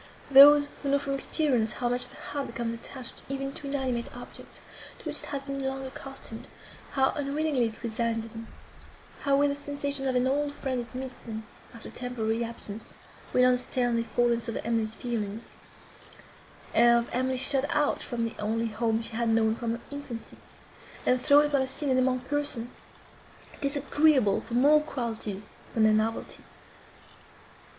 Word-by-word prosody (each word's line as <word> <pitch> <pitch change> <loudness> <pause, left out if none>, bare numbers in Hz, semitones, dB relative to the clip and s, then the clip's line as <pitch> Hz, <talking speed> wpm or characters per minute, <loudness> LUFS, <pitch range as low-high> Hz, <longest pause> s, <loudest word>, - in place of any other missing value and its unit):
Those, 285 +2 +9
who 280 - -2
know, 280 - +4
from 280 -1 -3
experience, 265 -5 +1
how 245 - -2
much 245 +1 -1
the - - -16
heart 285 -1 -4
becomes 235 -2 -3
attached 240 +1 -6
even 275 0 -3
to 280 - -8
inanimate 260 -4 -1
objects, - - -8 0.4
to - - -16
which - - -2
it - - -4
has 280 -1 -4
been 275 0 -4
long 270 0 -3
accustomed, 260 -3 -8 0.5
how 265 -1 +3
unwillingly 285 -3 0
it 220 +1 -9
resigns 230 0 -1
them; 225 0 -9 0.7
how 280 -1 +2
with 285 0 +4
the 280 - -1
sensations 285 -1 -3
of 260 - 0
an 250 0 +3
old 285 +2 0
friend 255 -4 -3
it 250 - -16
meets 260 -1 -6
them, 220 -1 -7 0.3
after 230 - -10
temporary 235 -2 -2
absence, 225 -2 -6 0.3
will 250 - +5
understand 250 -1 +2
the 230 - +1
forlornness 235 0 +1
of 230 - -3
Emily's 225 -1 0
feelings, 225 -2 -4 1.2
of 235 0 +5
Emily 260 +1 0
shut 270 +1 +3
out 295 -1 +1
from 235 -2 -2
the 230 - -4
only 225 +2 0
home 225 +1 0
she 225 - -7
had 235 0 +1
known 225 -1 +3
from 230 0 -2
her 235 - -6
infancy, 285 -5 -7 0.7
and 250 0 +3
thrown 285 +3 +6
upon 285 -2 +2
a 265 - 0
scene, 270 +1 -1
and 255 - +4
among 255 0 +2
persons, 260 -3 -1 0.9
disagreeable 280 -4 +3
for 235 - -6
more 290 +5 +6
qualities 225 -8 -4 0.3
than 225 - +3
their 215 0 +6
novelty. 220 +1 -1
250 Hz, 165 wpm, -28 LUFS, 230-275 Hz, 1.2 s, Those